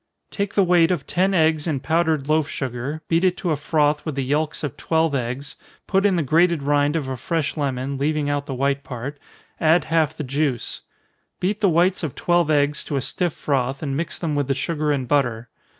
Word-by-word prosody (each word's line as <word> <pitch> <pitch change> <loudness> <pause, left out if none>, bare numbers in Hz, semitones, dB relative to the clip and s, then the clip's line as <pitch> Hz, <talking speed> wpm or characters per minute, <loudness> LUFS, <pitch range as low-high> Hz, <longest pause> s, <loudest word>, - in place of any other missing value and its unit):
_ - - -52
Take 200 -1 -3
the 200 - +5
weight 175 -2 +4
of 175 -6 -1
ten 190 +2 +1
eggs 160 -1 +2
in 150 -4 0
powdered 160 -1 +1
loaf 155 -1 +2
sugar, 135 +4 -4
beat 165 +2 +2
it 180 -1 +2
to 175 - -2
a - - +2
froth 150 0 +1
with 155 -4 -4
the 135 - -1
yelks 150 +4 -1
of 145 - -3
twelve 160 -2 0
eggs, 130 +1 -3 0.3
put 195 +2 +2
in 195 - +1
the 170 - +1
grated 165 +2 +3
rind 145 +1 +2
of 150 -5 -1
a 130 - -3
fresh 155 +5 -2
lemon, 135 -2 -2
leaving 150 +1 0
out 145 0 -1
the 135 - -4
white 140 +2 0
part 135 +3 -6 0.4
add 160 +2 +4
half 160 -1 +1
the 150 - -3
juice. 140 -2 -2 0.6
Beat 200 +3 -1
the 200 - +4
whites 175 +3 +2
of 155 -7 -4
twelve 175 -2 +2
eggs 145 -1 +2
to 145 - -2
a - - +2
stiff 175 +5 -1
froth, 135 0 -1
and 140 -2 -2
mix 165 +4 -2
them 165 -3 -2
with 145 -2 0
the 135 - +1
sugar 150 +1 -1
and 135 -3 -1
butter. 120 -5 0
150 Hz, 220 wpm, -22 LUFS, 140-165 Hz, 0.6 s, the